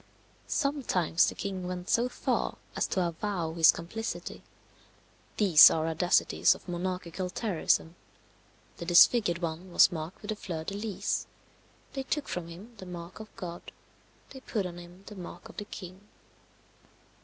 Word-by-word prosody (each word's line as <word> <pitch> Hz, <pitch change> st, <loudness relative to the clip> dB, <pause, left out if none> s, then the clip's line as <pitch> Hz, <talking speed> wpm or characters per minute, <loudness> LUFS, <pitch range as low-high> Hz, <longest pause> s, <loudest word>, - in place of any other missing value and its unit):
Sometimes 255 Hz, -, +1 dB
the -, -, -8 dB
king 190 Hz, -2 st, -4 dB
went 180 Hz, 0 st, -5 dB
so 240 Hz, +2 st, +2 dB
far -, -, -1 dB, 0.2 s
as -, -, 0 dB
to 185 Hz, -2 st, 0 dB
avow 170 Hz, -1 st, -3 dB
his 165 Hz, -1 st, +7 dB
complicity. 220 Hz, +7 st, -6 dB, 1.0 s
These 180 Hz, -7 st, +9 dB
are 160 Hz, -1 st, 0 dB
audacities 165 Hz, +2 st, +3 dB
of -, -, -16 dB
monarchical 180 Hz, 0 st, -3 dB
terrorism. 180 Hz, -4 st, 0 dB, 0.8 s
The 170 Hz, -, -6 dB
disfigured 175 Hz, 0 st, +5 dB
one 170 Hz, +3 st, -4 dB
was -, -, +6 dB
marked 165 Hz, +4 st, -6 dB
with 210 Hz, -, -8 dB
the 215 Hz, -, -1 dB
fleur 170 Hz, -6 st, -5 dB
de 195 Hz, -, -5 dB
lis; 205 Hz, 0 st, -2 dB, 0.7 s
they 270 Hz, -, -3 dB
took 280 Hz, +2 st, -2 dB
from 175 Hz, -2 st, -4 dB
him 190 Hz, +8 st, -11 dB
the 190 Hz, -, -10 dB
mark 175 Hz, +1 st, -8 dB
of 215 Hz, 0 st, -9 dB
God; 175 Hz, -1 st, -8 dB, 0.6 s
they 265 Hz, -, -9 dB
put 215 Hz, -6 st, -3 dB
on 175 Hz, -1 st, -6 dB
him 175 Hz, +2 st, -13 dB
the 210 Hz, -, -10 dB
mark 175 Hz, -2 st, -9 dB
of -, -, -14 dB
the 205 Hz, -, -5 dB
king. 185 Hz, -2 st, -9 dB
180 Hz, 155 wpm, -29 LUFS, 170-205 Hz, 1.0 s, These